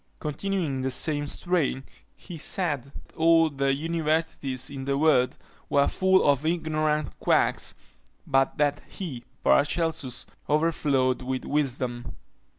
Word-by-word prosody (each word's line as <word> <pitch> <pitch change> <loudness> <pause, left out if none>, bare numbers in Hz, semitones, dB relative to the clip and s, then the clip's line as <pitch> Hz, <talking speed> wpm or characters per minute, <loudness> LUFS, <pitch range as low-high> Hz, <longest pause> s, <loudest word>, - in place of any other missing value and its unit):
Continuing 185 +5 -2
in - - -3
the 130 - -1
same 145 +2 0
strain, 160 -6 0 0.3
he 180 - -10
said, 150 -5 -1 0.2
all 165 -1 +4
the 140 0 0
Universities 155 -3 -1
in 135 -1 -6
the 140 0 0
world 140 -4 +3 0.3
were 140 0 +3
full 190 -2 +3
of 140 0 +3
ignorant 155 -2 -1
quacks; - - +1 0.5
but 135 0 +1
that 145 -1 +1
he, 140 -11 -6 0.2
Paracelsus, 150 -3 +1 0.2
overflowed 145 -5 +1
with 130 0 -3
wisdom. 125 -4 -2
145 Hz, 120 wpm, -26 LUFS, 135-160 Hz, 0.5 s, all